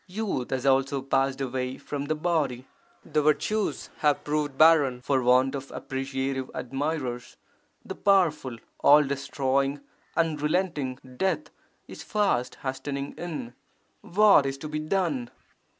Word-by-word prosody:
Youth 190 - -3
has 130 0 -2
also 135 0 +2
passed 135 0 +1
away 130 0 -3
from 140 0 -5
the 155 +2 -1
body. 150 -6 -1 0.4
The 155 0 +1
virtues 200 +8 0
have 150 -2 +2
proved 150 -2 -2
barren 145 -6 +5
for 135 -1 +1
want 125 +2 +4
of 135 -1 -5
appreciative 135 -1 -3
admirers. 135 -2 -3 0.5
The - - -5
powerful, 160 - +2 0.2
all 150 +1 +7
destroying, 140 0 -1 0.4
unrelenting 155 -3 0 0.2
Death 190 - -1 0.4
is - - -10
fast 195 - 0
hastening 140 +1 -4
in! 155 -9 -6 0.5
What 200 -7 +5
is 135 0 -3
to 155 - -7
be 150 0 -3
done? 155 -7 -1
140 Hz, 125 wpm, -27 LUFS, 130-155 Hz, 0.5 s, all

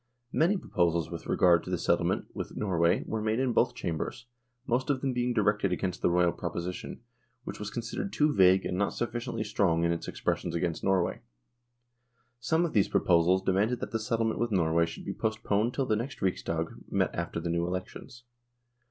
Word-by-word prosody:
Many 175 +6 +3
proposals 85 - 0
with - - -7
regard 85 -2 +4
to - - -8
the - - 0
settlement - - +1
with - - -6
Norway 85 -4 +2
were 110 0 -3
made 110 +2 0
in 130 -2 +1
both - - +2
Chambers, 120 - -4 0.4
most 125 +3 0
of 140 -2 +2
them 135 -2 0
being 125 0 0
directed 105 -4 +2
against 90 0 -2
the - - +3
Royal 85 0 +3
proposition, 85 +4 -5 0.4
which - - -7
was 105 0 -4
considered 120 - -4
too 150 0 +2
vague 95 -2 +5
and 90 - -2
not 100 - +1
sufficiently 120 -2 -3
strong 95 -6 +1
in 85 - +2
its 85 - -3
expressions 85 -1 -2
against 85 -1 -2
Norway. 95 -2 +1 1.2
Some 160 +8 +1
of 165 - -4
these 100 -3 +3
proposals 90 +2 +3
demanded 105 +6 +1
that - - -5
the 115 - -1
settlement 115 -1 -1
with 120 +1 0
Norway 85 -3 +2
should - - -9
be - - -3
postponed 110 +1 0
till 135 - 0
the 110 - +1
next 120 +6 -4
Riksdag 85 -4 -1 0.2
met - - +1
after - - -3
the 85 - -3
new 85 0 0
elections. 95 +6 -6
100 Hz, 185 wpm, -29 LUFS, 85-120 Hz, 1.2 s, vague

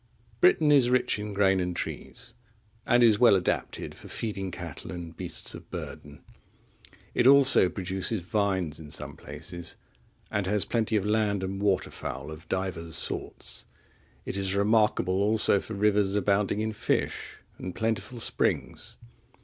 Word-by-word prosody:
Britain 260 - +5
is 135 -4 +5
rich 125 -4 +2
in 105 0 -5
grain 95 -1 +3
and 90 -1 -2
trees, - - -6 0.5
and 120 0 +5
is 110 -3 +5
well 120 -5 +7
adapted 90 -3 -2
for - - -12
feeding 100 -4 -3
cattle 85 -5 -8
and 85 -2 -7
beasts - - -3
of - - -11
burden. 75 0 -8 0.9
It 120 - +3
also 135 -8 +6
produces 95 +3 -2
vines 95 -5 -1
in 75 -2 -10
some 75 - -5
places, 85 -1 -8 0.6
and 105 -2 -1
has 105 0 +2
plenty 115 -1 0
of 105 -2 +1
land 105 -2 +1
and 95 +1 -4
water 100 -3 +1
fowl 70 +3 -6
of 80 +1 -11
divers 90 -4 -2
sorts; - - -1 0.6
it - - -3
is 95 0 0
remarkable 100 -3 +2
also 105 -1 +4
for 110 - -7
rivers 100 -1 +2
abounding 100 +1 +1
in 110 0 -2
fish, - - -2 0.2
and 90 - -6
plentiful 115 +2 -2
springs. - - -1
100 Hz, 150 wpm, -27 LUFS, 90-110 Hz, 0.9 s, well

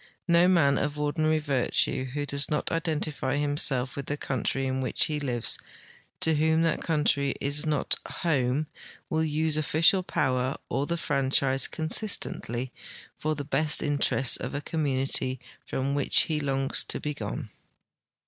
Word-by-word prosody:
No 170 +1 +5
man 155 -7 +4
of 145 0 -2
ordinarv 155 +1 0
virtue 135 -2 0
who 145 +3 -4
does 140 0 0
not 150 - -1
identify 155 -4 -1
himself 145 -3 +1
with 140 -2 -6
the 145 - -2
country 135 0 -1
in 130 0 -1
which 130 - 0
he 150 -1 -2
lives, 125 -5 -1 0.6
to 160 - +3
whom 160 +2 +2
that 165 - +1
country 145 -3 +1
is 145 +2 +2
not 150 -2 +1
" - - -13 0.2
home," 140 -2 +1 0.5
will 160 0 +1
use 155 0 +1
official 165 +5 +3
})Ower 130 0 +1
or 140 +1 -1
the 170 - -1
franchise 135 -3 +1
consistently 155 - -1 0.4
for 155 0 -2
the 145 - -5
best 150 +2 +2
interests 140 -3 +2
of - - -5
a 145 - -2
community 135 -4 -1 0.3
from 135 +1 -2
which 140 -1 +3
he 155 -2 -1
longs 135 -2 0
to - - -2
be 150 - -3
gone. 140 -5 -6
145 Hz, 155 wpm, -27 LUFS, 135-155 Hz, 0.6 s, No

